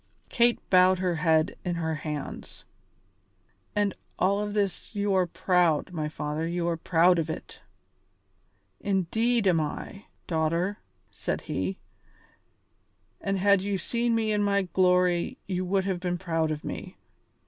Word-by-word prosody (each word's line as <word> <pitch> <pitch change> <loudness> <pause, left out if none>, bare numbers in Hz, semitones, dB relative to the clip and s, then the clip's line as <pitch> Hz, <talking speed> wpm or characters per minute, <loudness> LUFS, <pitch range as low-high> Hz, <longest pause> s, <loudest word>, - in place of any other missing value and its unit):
Kate 240 -1 +3
bowed 185 0 +6
her 180 -2 0
head 160 -1 +2
in 175 -2 -1
her 160 -1 -1
hands. 150 -2 -6 1.1
"And 205 -2 +1
of - - -30 0.2
all 200 +3 +1
this 205 0 -2
you 205 -1 +1
are 185 -2 +3
proud, 180 -2 +1
my 155 -2 -2
father, 150 +1 -3
you 170 0 -1
are 170 - 0
proud 170 +2 +3
of 165 0 -2
it!" - - -7 1.2
"Indeed 205 +4 +1
am 175 -3 +4
I, 195 +6 -6 0.2
daughter," 170 +4 0 0.3
said - - -3
he; 95 +1 -3 1.4
"and 195 0 -1
had 200 0 +4
you 200 0 -1
seen 235 +6 0
me 220 -1 +1
in 210 -1 +1
my 200 -1 +2
glory 180 -1 +2
you 185 -2 -2
would 190 +1 +1
have 190 -2 -1
been 180 0 -2
proud 165 -2 -1
of 150 -1 -3
me. - - -6
180 Hz, 145 wpm, -27 LUFS, 165-200 Hz, 1.4 s, bowed